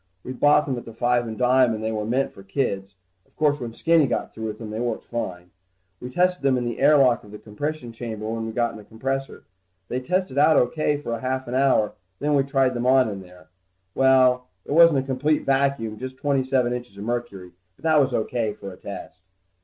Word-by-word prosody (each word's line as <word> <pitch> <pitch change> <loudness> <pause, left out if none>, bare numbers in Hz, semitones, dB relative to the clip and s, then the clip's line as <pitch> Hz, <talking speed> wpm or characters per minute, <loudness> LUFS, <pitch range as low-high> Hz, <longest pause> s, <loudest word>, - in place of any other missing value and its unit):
We 130 - -6
bought 145 +3 +4
them 130 -3 -2
at - - -13
the 115 - -11
five 120 0 +1
and 110 -1 -6
dime, 125 -2 +3
and 110 - -6
they 110 - -1
were 105 -1 -2
meant 130 +4 0
for - - -13
kids. 100 -2 -3 0.3
Of - - -36
course 150 -1 +2
when 120 -3 -5
Skinny 160 +4 +3
got - - -3
through 110 0 -5
with 105 -1 -5
them, 110 -2 -8
they 110 - -4
worked 120 -2 -3
fine. 90 -7 -5 0.5
We 125 - -7
tested 180 +5 +1
them 135 -2 +2
in 120 - -2
the 120 - -4
air 145 +2 +6
lock 125 -4 +3
of 105 - -15
the 105 - -9
compression 125 +5 -5
chamber 110 -2 -6
when 115 0 -3
we - - -4
got 120 +1 -1
the 105 - -10
compressor 135 +6 -4
in. - - -24 0.5
They 125 - -1
tested 180 0 -1
out 155 0 +5 0.2
pretty 155 -1 +1
good 145 - -7
for 115 - -3
a 115 - -3
half 130 0 -2
hour, 130 -4 +2 0.2
then 150 +1 0
we 140 - +4
tried 135 -2 +1
them 120 0 -2
on 130 -2 +4
in 100 -2 -6
there. 90 -3 -17 0.4
Well, 130 -1 +4 0.2
it - - -8
wasn't 165 -1 +6
a 135 - +1
complete 140 +3 0
vacuum, 135 -6 0
just 130 0 -7
twenty 140 -1 +1
seven 130 -2 +1
inches 120 -5 -7
of 100 - -7
mercury, 110 -6 -4 0.2
but - - -26
that 155 -2 +4
was 135 -1 +1
O.K. 110 -2 -1
for 100 -2 -9
a - - -14
test. - - -9
125 Hz, 235 wpm, -24 LUFS, 110-135 Hz, 0.5 s, air